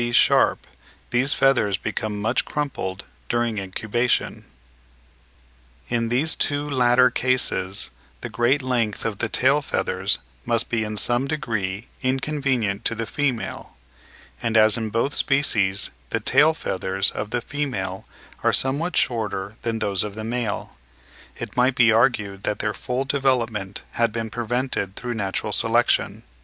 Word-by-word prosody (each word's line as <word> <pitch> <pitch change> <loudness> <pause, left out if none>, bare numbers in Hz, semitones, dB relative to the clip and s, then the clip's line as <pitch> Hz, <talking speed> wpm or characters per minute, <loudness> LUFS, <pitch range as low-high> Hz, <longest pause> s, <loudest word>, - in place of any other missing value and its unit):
B. 120 0 0
Sharpe 120 - +4 0.5
these 125 +3 +2
feathers 120 -8 +3
become 105 +1 -3
much 110 +4 +1
crumpled 125 -10 -3 0.3
during 120 -3 0
incubation. 110 +5 -1 1.4
In 115 -1 0
these 135 +7 +2
two 145 0 -1
latter 125 -2 +4
cases 120 -7 0 0.3
the - - -4
great 130 +4 +1
length 120 -5 -1
of 110 -3 -2
the 110 - -1
tail 135 +6 +3
feathers - - 0 0.3
must 115 +3 0
be 115 -2 0
in 105 0 -4
some 120 +5 +1
degree 110 -9 -2 0.2
inconvenient 130 -6 0
to 115 - +1
the 115 +1 -3
female; 130 - -3 0.6
and 115 -1 +1
as 110 -1 +6
in 110 -2 -2
both 115 +6 0
species 105 -9 +1 0.2
the - - 0
tail 155 +2 +4
feathers 95 -7 -1
of 105 - -4
the 120 - 0
female 120 -9 -3 0.4
are - - +3
somewhat 145 +7 0
shorter 105 -4 -1
than 115 -1 -1
those 100 -3 0
of 105 -1 -6
the 110 - -5
male, 115 -1 -3 0.6
it - - -6
might 125 +1 +3
be 120 -3 +5
argued 110 -4 +2
that 105 - -1
their 105 - -1
full 125 +4 -2
development 120 -8 0
had 115 -1 +1
been 115 0 -4
prevented 120 -4 -2
through 120 -1 -4
natural 100 -4 -2
selection. - - +2
120 Hz, 145 wpm, -23 LUFS, 105-130 Hz, 1.4 s, as